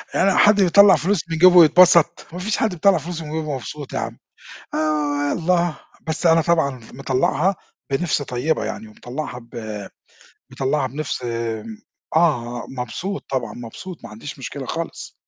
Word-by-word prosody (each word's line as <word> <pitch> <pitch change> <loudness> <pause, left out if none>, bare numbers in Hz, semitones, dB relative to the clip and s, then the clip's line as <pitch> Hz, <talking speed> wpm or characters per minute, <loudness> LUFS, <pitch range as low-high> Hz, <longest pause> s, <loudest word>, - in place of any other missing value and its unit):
يعني 195 +1 +3
حد 205 -1 +5
بيطلَّع 195 +2 +7
فلوس 185 -1 0
من 165 - -2
جيبه 180 +1 +7
ويتبسط! 170 0 +6
ما 180 - -5
فيش 210 +4 -1
حد 220 - +1
بيطلَّع 185 +2 +4
فلوس 165 +1 -5
من 155 - -7
جيبه 160 +1 -2
بيبقى 150 -3 -3
مبسوط 140 +2 -8
يا - - -1
عم. - - -5 0.6
آآ 150 -2 0
يالّا، 175 0 +1 0.3
بس 160 +2 -3
أنا 165 0 +5
طبعًا 155 -7 +1
مطلَّعها 135 +8 0 0.4
بنِفْس 150 +1 0
طيبة 125 -1 -1
يعني 110 0 -6
ومطلَّعها 125 +4 -7
ب 110 -3 -7 0.7
مطلَّعها 135 0 0
بنِفْس 140 0 -4
م 115 -2 -4 0.4
آه، 120 -8 +1
مبسوط 180 - -4
طبعًا، 120 -5 -2
مبسوط، 125 +10 -9
ما 115 - -9
عنديش 115 +7 -9
مشكلة 135 +1 -6
خالص. 165 +4 -5
150 Hz, 155 wpm, -21 LUFS, 125-170 Hz, 0.7 s, بيطلَّع